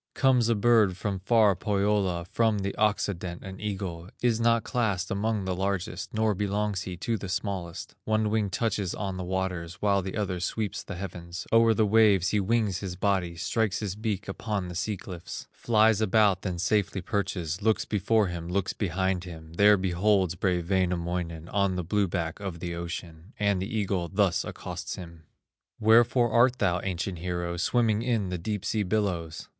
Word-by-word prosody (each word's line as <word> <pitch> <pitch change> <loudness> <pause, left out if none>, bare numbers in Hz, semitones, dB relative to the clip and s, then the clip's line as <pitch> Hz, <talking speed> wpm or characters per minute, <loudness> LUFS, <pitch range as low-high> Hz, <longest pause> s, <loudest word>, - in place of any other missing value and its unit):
Comes 125 -4 +3
a 115 - +3
bird 105 -4 +4
from 95 0 -2
far 105 0 +4
Pohyola, 100 -3 0
From 110 +3 +1
the 100 0 -2
occident, 95 -4 -1
an 95 0 -8
eagle, 95 -4 -4
Is 120 -2 +2
not 115 0 +3
classed 100 -7 -1
among 105 0 -1
the 95 - -1
largest, 100 +3 -2
Nor 110 -1 +1
belongs 100 0 -1
he 90 -2 -6
to 115 +5 -1
the 100 -1 -6
smallest; 95 -3 -4
One 110 -1 +1
wing 105 -2 +1
touches 100 -2 -1
on 95 -2 -3
the 90 - -4
waters, 90 -2 -3
While 100 0 +2
the 95 +2 -5
other 95 -4 -1
sweeps 105 +3 -2
the - - -7
heavens; 90 -1 -6
O'er 115 -1 +6
the 110 - +3
waves 105 -4 +4
he 105 - +1
wings 100 -2 +1
his 95 -3 -5
body, 95 -3 0
Strikes 110 +4 0
his 100 -3 -3
beak 105 -2 -3
upon 100 -1 -3
the - - -6
sea 100 +4 -2
cliffs, 90 -2 -8
Flies 110 -2 +3
about, 105 -2 +3
then 90 -3 -3
safely 95 +1 0
perches, 90 -3 -2
Looks 110 +1 +2
before 110 +1 +2
him, 85 -2 -5
looks 95 +1 -1
behind 95 -1 -1
him, 80 -2 -10
There 105 +3 +6
beholds 95 0 +2
brave 90 -2 -1
Wainamoinen, 85 -3 -1
On 100 -2 +1
the 90 - -2
blue 100 +3 +1
back 85 -2 -3
of 95 -4 -5
the 85 0 -4
ocean, 85 +2 -7
And 100 -2 +1
the 95 - -3
eagle 95 -5 -1
thus 95 -3 +2
accosts - - -6
him: 85 -3 -11 0.5
"Wherefore 120 +2 +4
art 125 +1 +4
thou, 90 -5 +1
ancient 90 -1 -3
hero, 85 0 -3
Swimming 110 +2 +2
in 115 -6 0
the 90 -1 -3
deep 105 +2 -3
sea 110 - 0
billows?" 90 -5 -2
95 Hz, 180 wpm, -27 LUFS, 90-105 Hz, 0.5 s, O'er